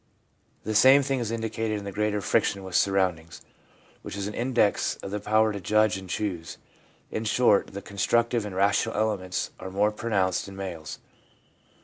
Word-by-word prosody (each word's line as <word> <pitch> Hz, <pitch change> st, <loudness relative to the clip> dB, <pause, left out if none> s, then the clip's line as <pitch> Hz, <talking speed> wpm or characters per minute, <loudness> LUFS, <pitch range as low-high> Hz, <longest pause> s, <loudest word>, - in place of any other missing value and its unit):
The 110 Hz, -, -3 dB
same 130 Hz, +6 st, +7 dB
thing 135 Hz, -1 st, -1 dB
is 115 Hz, -3 st, -2 dB
indicated 110 Hz, -1 st, -2 dB
in 100 Hz, -, -6 dB
the 100 Hz, -, -5 dB
greater 105 Hz, +1 st, -1 dB
friction 100 Hz, -1 st, +1 dB
with 95 Hz, -1 st, -8 dB
surround 95 Hz, -4 st, +2 dB
ings, 80 Hz, +1 st, -13 dB, 0.6 s
which -, -, -7 dB
is 100 Hz, -, -3 dB
an 105 Hz, -, -4 dB
index 120 Hz, -4 st, +1 dB
of 95 Hz, -, -6 dB
the 105 Hz, -, -2 dB
power 110 Hz, +1 st, +2 dB
to 100 Hz, -, -4 dB
judge 110 Hz, +3 st, +2 dB
and 95 Hz, -1 st, -8 dB
choose. 85 Hz, -2 st, -3 dB, 0.5 s
In 110 Hz, -, -3 dB
short, 105 Hz, -1 st, +3 dB
the 100 Hz, 0 st, -7 dB
constructive 115 Hz, +4 st, +1 dB
and 105 Hz, -3 st, -6 dB
rational 100 Hz, +3 st, +1 dB
elements 100 Hz, -4 st, -1 dB
are 95 Hz, -, -6 dB
more 100 Hz, +3 st, +1 dB
pronounced 100 Hz, -5 st, -1 dB
in 100 Hz, -, -10 dB
males. 90 Hz, -5 st, -6 dB
105 Hz, 175 wpm, -26 LUFS, 95-110 Hz, 0.6 s, same